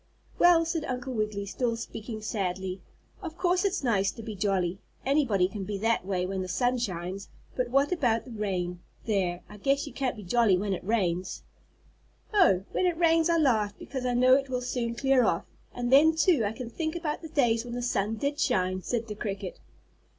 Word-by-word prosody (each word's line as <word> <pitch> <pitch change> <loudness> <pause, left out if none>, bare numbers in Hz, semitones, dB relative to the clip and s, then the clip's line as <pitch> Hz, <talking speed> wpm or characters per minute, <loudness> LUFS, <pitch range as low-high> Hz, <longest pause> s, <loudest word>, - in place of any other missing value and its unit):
"Well," 345 -1 +6
said 325 -1 -2
Uncle 255 +1 -4
Wiggily, 215 -3 -2
still 230 +3 -1
speaking 220 -1 -7
sadly, 190 -2 -3 0.4
"of 335 -3 -7
course 360 0 +2
it's 390 -6 0
nice 200 -6 +2
to 230 - -9
be 215 -1 -6
jolly, 190 -2 0 0.3
anybody 260 -10 +3
can 195 +1 -6
be 205 +1 -3
that 225 +3 +1
way 185 -2 0
when 190 0 -3
the 185 - -4
sun 245 +7 +1
shines, 185 -2 -4 0.3
but 250 -1 -1
what 275 +5 +2
about 245 -10 +1
the 250 - -10
rain? 185 -5 -2 0.3
There! 185 -5 0
I 210 - -12
guess 275 +7 +1
you 290 - -9
can't 265 -3 -1
be 210 - -9
jolly 210 0 +3
when 200 +1 -1
it 185 - -5
rains." 185 -4 -1 0.9
"Oh! 340 - +4
when 370 - +1
it 345 -2 0
rains 330 -1 +3
I 335 - +3
laugh 220 -9 +2
because 260 -1 -6
I 245 - 0
know 255 +1 +5
it 270 0 +2
will 250 -1 -1
soon 240 -2 -2
clear 265 0 +3
off, 170 -6 +1 0.3
and 245 0 -3
then, 315 +4 +6
too, 320 - +3
I 205 - 0
can 235 0 -7
think 315 +3 -3
about 330 -3 -3
the 320 - -8
days 235 -6 +2
when 240 -1 -6
the 245 - -3
sun 215 -2 0
did 280 +6 -2
shine," 185 0 +1
said 235 +3 -2
the 215 - -5
cricket. 200 -3 -5
230 Hz, 205 wpm, -28 LUFS, 195-275 Hz, 0.9 s, Well